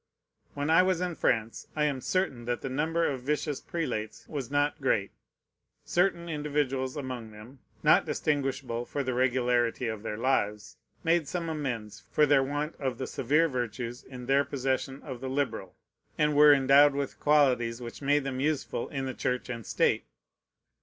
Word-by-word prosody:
When 145 +2 -1
I 165 - +7
was 185 -2 +1
in 180 -1 -1
France, 115 -7 -1
I 150 - +1
am 140 -3 -1
certain 140 -11 -1
that 120 0 -2
the 135 - -4
number 160 +5 0
of 135 -3 -1
vicious 150 +1 -2
prelates 120 -11 -4
was 140 -6 -5
not 145 +2 0
great. 105 -7 +1 0.7
Certain 175 -1 +1
individuals 145 -4 -1
among 130 -5 -5
them, 110 +6 -13 0.2
not - - +5
distinguishable 135 -5 -1
for 140 +3 -3
the 130 -1 -2
regularity 125 -1 +1
of 110 -2 -4
their 105 -1 -4
lives, 110 -3 -1 0.3
made 165 -2 +2
some 170 0 -3
amends 125 -9 -4
for 150 - +4
their 145 -2 +4
want 145 +3 -2
of 130 -4 -2
the 130 - -3
severe 150 +8 +2
virtues 120 -2 -4
in 125 -2 -9
their 135 +2 +3
possession 135 0 -2
of 130 -4 -7
the 130 - -4
liberal, 125 -9 -2 0.4
and 150 0 +2
wore 150 0 +8
endowed 140 +1 +6
with 140 -1 -3
qualities 125 -6 +3
which 120 +2 -8
made 145 +1 +2
them 135 -1 -3
useful 145 -4 -1
in 135 -1 -3
the 130 - -3
Church 125 0 -2
and 115 -3 -6
State. - - +1
135 Hz, 170 wpm, -29 LUFS, 125-150 Hz, 0.7 s, wore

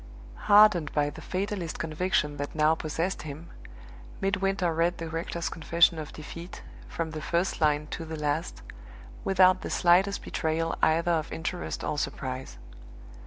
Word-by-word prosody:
Hardened 205 -8 +6
by 145 -1 +1
the - - -11
fatalist 190 -3 -3
conviction 155 -2 -1
that 145 +2 -5
now 155 0 +4
possessed 165 +4 -2
him, 155 +3 -9 0.7
Midwinter 195 -3 0
read 170 +2 +1
the 165 - -5
rector's 165 +1 -3
confession 165 0 +3
of 155 - -6
defeat, 170 +4 -9 0.2
from 165 -1 -4
the 155 -1 -6
first 170 +3 -1
line 150 -1 +2
to 165 - -4
the 160 0 -6
last, 150 +3 -2 0.6
without 185 -1 +4
the - - -5
slightest 185 +3 +3
betrayal 165 0 -1
either 165 +2 +3
of 160 -2 -1
interest 175 +2 -4
or 150 - -1
surprise. 130 - -4
165 Hz, 145 wpm, -28 LUFS, 155-180 Hz, 0.7 s, Hardened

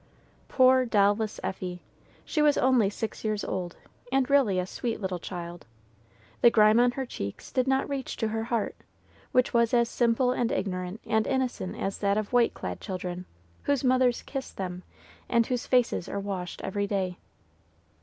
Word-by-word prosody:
Poor 260 0 +5
doll 205 -4 +4
less 220 -1 -4
Effie! 180 -2 -4 0.4
She 305 - 0
was 295 -1 +4
only 250 -6 +4
six 215 +2 -5
years 215 -1 -1
old, 180 -2 -4 0.3
and 270 0 +1
really 255 -10 +4
a 180 - 0
sweet 230 +4 -4
little 190 -3 -3
child. 175 -3 -7 0.7
The 240 - +8
grime 215 0 +5
on 245 0 +4
her 265 +1 -3
cheeks 100 - -6
did 255 0 +1
not 265 0 +2
reach 275 -2 -4
to 225 - -1
her 225 +1 -2
heart, 235 -2 -1 0.6
which 255 0 +2
was 235 0 +3
as 235 -1 +3
simple 240 +1 +2
and 240 -2 0
ignorant 185 +1 -3
and 220 0 +1
innocent 255 -8 -1
as 195 - -3
that 200 0 +1
of 215 +2 -3
white 245 -1 +3
clad - - -5
children, 180 -2 -5 0.4
whose 285 -2 +1
mothers 255 -1 +3
kiss 270 -2 -5
them, 180 -2 -5 0.5
and 235 -1 +3
whose 250 0 -2
faces 245 -7 +2
are 200 - -3
washed 190 -3 -5
every 200 +1 -1
day. 190 -3 -2
220 Hz, 175 wpm, -28 LUFS, 190-250 Hz, 0.7 s, The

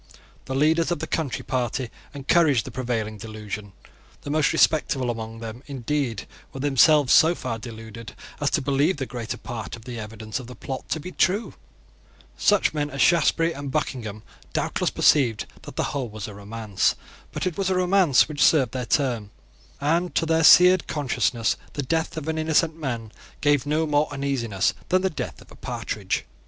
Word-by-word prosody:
The 130 - -4
leaders 160 +4 +3
of 175 - 0
the 160 - -4
Country 155 -4 -2
Party 125 -1 -2 0.2
encouraged 140 -3 +3
the - - -7
prevailing 115 -4 -3
delusion. 105 -2 -7 0.5
The 145 - -4
most 150 -1 +2
respectable 145 -6 +2
among 115 0 -7
them, 115 +2 -7
indeed, 135 -4 -2 0.3
were 135 - -8
themselves 145 0 +4
so 165 +2 +6
far 115 -7 -4
deluded 115 0 -9 0.3
as - - +1
to - - 0
believe 145 +5 +2
the 135 - -3
greater 115 -1 -5
part 115 -3 -6
of 115 -1 -15
the 120 -2 -6
evidence 110 +1 -6
of 125 - -9
the 125 - -10
plot 130 -1 -6
to 160 - -1
be 180 +4 -7
true. 200 +6 +1 0.8
Such 205 -5 +3
men 150 -1 -1
as 140 -1 -7
Shaftesbury 165 0 +3
and 140 -1 -6
Buckingham 120 -7 -3 0.3
doubtless - - 0
perceived 120 -8 +3 0.2
that - - -11
the - - 0
whole 135 -5 -2
was 110 -1 -6
a 105 - -8
romance. 105 -1 -1 0.4
But - - -3
it 180 -3 -1
was 195 -1 -1
a 190 - +1
romance 180 -6 +4
which 150 -1 0
served 135 -8 +4
their 125 -1 -4
turn; 120 -6 0 0.5
and 165 +5 0
to - - +2
their 165 0 +2
seared 180 +3 +7
consciences 130 -5 0 0.2
the 145 - -3
death 160 +4 -1
of 155 -1 -5
an 160 0 -1
innocent 160 0 +2
man 120 -8 -4 0.3
gave 145 -1 +2
no 155 +2 +1
more 150 0 +1
uneasiness 130 -8 0 0.2
than 185 +1 +3
the 190 - +1
death - - -6
of - - -23
a - - -13
partridge. - - -3
135 Hz, 180 wpm, -24 LUFS, 115-155 Hz, 0.8 s, seared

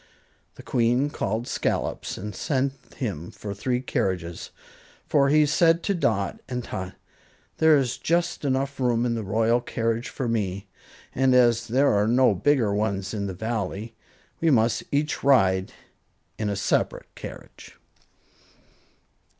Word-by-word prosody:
The - - -12
Queen 125 +4 +1
called 110 +2 -2
Scollops - - -2
and 105 +2 -6
sent 135 +1 -1 0.2
him 95 - -4
for 100 -2 -7
three 125 +5 -1
carriages 90 -8 -2 0.6
"For," 140 -2 +3
she 150 +1 +5
said 165 +3 +3
to 200 - +1
Dot 110 - 0
and 125 -1 -3
Tot, 95 -4 -6 0.6
"there 160 -1 +6
is 130 -3 -1
just 170 0 0
enough 135 0 -1
room 120 -2 +1
in 120 - 0
the 115 - -2
royal 110 +4 +1
carriage 115 0 -2
for 130 - -4
me, 100 -4 -2 0.5
and 130 0 +3
as 120 -2 +4
there 135 +3 +3
are 105 +1 +2
no 125 -1 +4
bigger 115 +1 +2
ones 100 -2 -1
in 100 -2 -2
the 95 - -5
Valley, 110 +1 -3 0.5
we 165 - +2
must 115 -4 +2
each 150 +1 -1
ride 95 -9 +3 0.7
in 105 -1 -1
a 100 - -1
separate 95 - -1
carriage." - - -11
115 Hz, 140 wpm, -25 LUFS, 100-135 Hz, 0.7 s, there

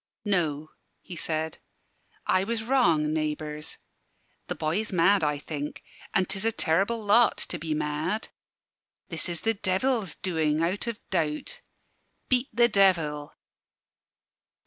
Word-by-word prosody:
"No," 155 -6 0 0.3
he 180 - -10
said, 160 -1 -3 0.7
"I 185 - +3
was 225 +2 -2
wrong, 170 - +3
naybours. 150 -1 -3 0.7
The - - -2
boy 155 +3 -1
is 220 - -3
mad, 190 +1 +4
I 150 -1 +1
think; 145 0 -6 0.3
an' 190 - +4
'tis 190 +2 -3
a 225 - +3
terrible 200 +4 +1
lot, 230 +4 +5
to 175 - -4
be 155 0 -2
mad. 155 +7 -2 0.8
This 165 0 0
is 170 -2 -2
the 225 - +2
Devil's 200 - 0
doing, 160 -3 0
out 185 +7 -1
o' 235 - 0 0.2
doubt. 155 -5 -2 0.7
Beat 255 0 +2
the 240 -1 +5
Devil." 170 -9 +2
170 Hz, 130 wpm, -27 LUFS, 155-205 Hz, 0.8 s, lot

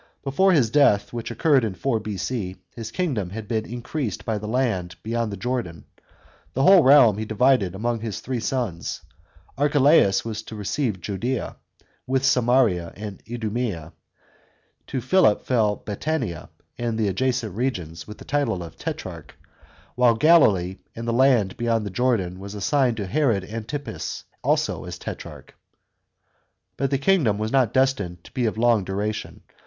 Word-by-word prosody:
Before 190 +8 +3
his 130 -10 +3
death, 120 -8 +3
which 115 -1 -4
occurred 145 -6 +3
in 105 -4 -2
4 115 +5 0
B.C., 105 -1 -4 0.2
his 115 -2 -6
kingdom 120 - -2
had 105 +2 -7
been 110 -1 -2
increased 120 - -4
by 110 -2 -1
the 105 - -6
land 110 -8 -1
beyond 115 0 -1
the 100 - -5
Jordan. 110 -6 -3 0.7
The 135 - +1
whole 190 +1 +8
realm 130 -7 +6
he 110 - -2
divided 110 -4 +2
among 115 +3 -1
his 110 -3 -4
three 130 -1 -3
sons. 115 -9 -3 0.6
Archelaus 145 -8 +4
was 110 -1 -4
to 110 - -10
receive 105 -1 -2
Judea, 110 +7 -3 0.5
with 130 +1 +1
Samaria 120 -9 +2
and 105 -2 -8
Idumea; 110 -8 -3 0.9
to 130 - -3
Philip 180 - +3
fell 110 -5 +2
Batanea 110 - -3 0.3
and 120 -2 -1
the 110 -2 +1
adjacent 120 0 -1
regions, 90 -10 -3
with 105 - -9
the - - -12
title 140 -11 0
of 80 -1 -11
tetrarch; - - -6 0.6
while 125 -2 +4
Galilee 110 - +4 0.2
and 115 +1 -6
the 115 - 0
land 120 -6 +3
beyond 115 -3 0
the 100 - -5
Jordan 95 -5 0
were 100 - -8
assigned 115 +4 0
to 105 - -3
Herod 120 -3 +1
Antipas, 115 +8 -5 0.2
also - - 0
as - - -6
tetrarch. - - -9 1.2
But 135 0 -1
the 135 - +1
kingdom 135 - +2
was 110 +1 -2
not 130 -5 +3
destined 105 -10 0
to - - -15
be 125 -3 0
of 110 - -3
long 115 -3 +3
duration. 105 +3 -4
115 Hz, 155 wpm, -24 LUFS, 100-130 Hz, 1.2 s, whole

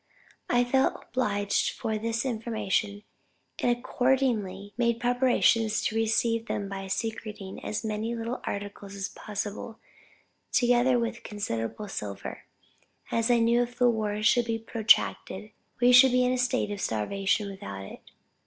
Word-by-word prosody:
I 245 0 +4
felt 265 +2 +2
obliged 205 -5 0
for 220 -1 -2
this 230 +3 -1
information, 220 -3 -1 0.6
and - - +2
accordingly 240 -7 0
made 235 0 +1
preparations 240 -3 +3
to 220 - -1
receive 225 +1 +1
them 200 - -2
by 195 0 -6
secreting 210 -1 -4
as 215 - -3
many 220 +2 -2
little 230 +2 -4
articles 200 0 -6
as 200 0 -3
possible; 210 +1 -5 0.7
together 245 0 +4
with 235 0 -2
considerable 205 - -4
silver; 105 - -6 0.7
as 230 +1 +1
I 240 - +5
knew 235 +1 +3
if 245 0 -4
the 245 -1 +4
war 215 -2 -2
should 235 +2 +4
be 225 -1 -1
protracted, 220 -2 +1 0.3
we 245 +1 +5
should 250 +1 +8
be 250 0 +4
in 250 - +2
a - - 0
state 250 -4 0
of 205 -1 -4
starvation 195 - 0
without 100 - -7
it. - - -11
225 Hz, 145 wpm, -28 LUFS, 205-240 Hz, 0.7 s, should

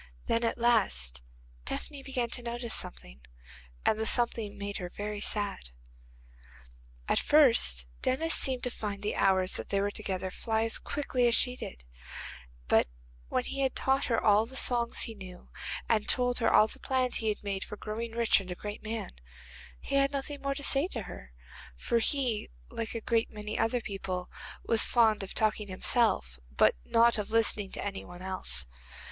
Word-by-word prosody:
Then, 230 +1 +1
at 230 - 0
last, 190 - +1 0.4
Tephany 285 - -5
began 255 -3 -3
to - - -3
notice 235 -1 -3
something, - - -4 0.6
and 220 - +2
the 220 - 0
something 230 -3 +3
made 200 0 -4
her 180 -1 -5
very 205 +2 -5
sad. 205 - -1 1.4
At - - +3
first, 235 - +4 0.2
Denis 320 +6 +1
seemed 260 -2 +1
to 250 - 0
find 205 -3 -5
the 210 - -1
hours 190 -1 +2
that - - -6
they 200 - +1
were 200 +1 0
together 190 -3 -4
fly 220 +1 0
as 225 - 0
quickly 255 -4 0
as 235 - +6
she 250 0 +5
did, 60 - -8 0.8
but - - +4 0.4
when - - 0
he 275 - -5
had 265 -1 +1
taught 270 +1 +1
her 230 - +1
all 215 +1 +4
the 265 - -12
songs 240 -2 +2
he 225 - 0
knew, 185 -4 -11 0.4
and 215 -2 +1
told 245 -1 +1
her 230 - +2
all 215 - +6
the - - -8
plans 255 -2 0
he 220 - 0
had 210 - -3
made 200 -1 -3
for 210 - -8
growing 225 +2 -5
rich 230 -2 +3
and 185 - -10
a 180 - -4
great 205 +3 -7
man, 225 +1 -4 0.7
he - - -7
had 275 0 +3
nothing 285 +1 -4
more 275 0 -2
to 285 - -4
say 275 +4 +3
to 235 - -5
her, 60 - -10 0.5
for 235 - 0
he, 245 -2 0 0.2
like 225 0 -4
a 230 - -3
great 230 +1 +1
many 210 0 -6
other 235 +2 +1
people, 190 -3 -5 0.3
was 225 -1 +5
fond 225 -3 +3
of 195 - -6
talking 215 -1 0
himself, 185 - +1
but - - +4
not 230 0 +4
of 210 - -4
listening 215 -3 +2
to - - -5
any 200 -1 -4
one 175 +1 -11
else. 70 - +1
220 Hz, 185 wpm, -30 LUFS, 195-240 Hz, 1.4 s, as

